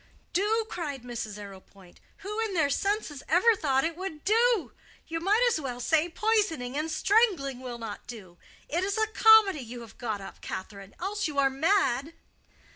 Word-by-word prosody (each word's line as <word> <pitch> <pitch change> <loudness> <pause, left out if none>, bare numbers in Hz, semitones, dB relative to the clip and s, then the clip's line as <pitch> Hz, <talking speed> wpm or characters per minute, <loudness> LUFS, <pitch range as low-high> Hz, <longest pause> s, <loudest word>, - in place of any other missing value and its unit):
"Do!" 435 +4 +1
cried 290 - -5
Mrs. 230 -4 -5
Arrowpoint; 195 -2 -13 0.3
"who 420 +2 -4
in 440 -4 -1
their 300 -4 +2
senses 395 -5 -1
ever 405 +8 +5
thought 270 -7 +1
it 330 0 -1
would 345 -4 -6
do? 455 -1 +3 0.3
You 330 0 -4
might 415 +8 +3
as 455 -10 +1
well 250 -3 -5
say 315 +7 +2
poisoning 345 - 0
and 305 +2 -1
strangling 345 - +2
will 250 -2 -6
not 225 -3 -8
do. 185 -8 -10 0.3
It 340 +4 -1
is 395 +2 -1
a 440 - +3
comedy 440 -5 +6
you 240 0 -8
have 230 - -13
got 220 -4 -3
up, 195 - -11
Catherine. 195 0 -7
Else 395 +1 -2
you 295 -2 -6
are 270 -1 +3
mad." 320 -1 +1
315 Hz, 175 wpm, -28 LUFS, 245-405 Hz, 0.3 s, comedy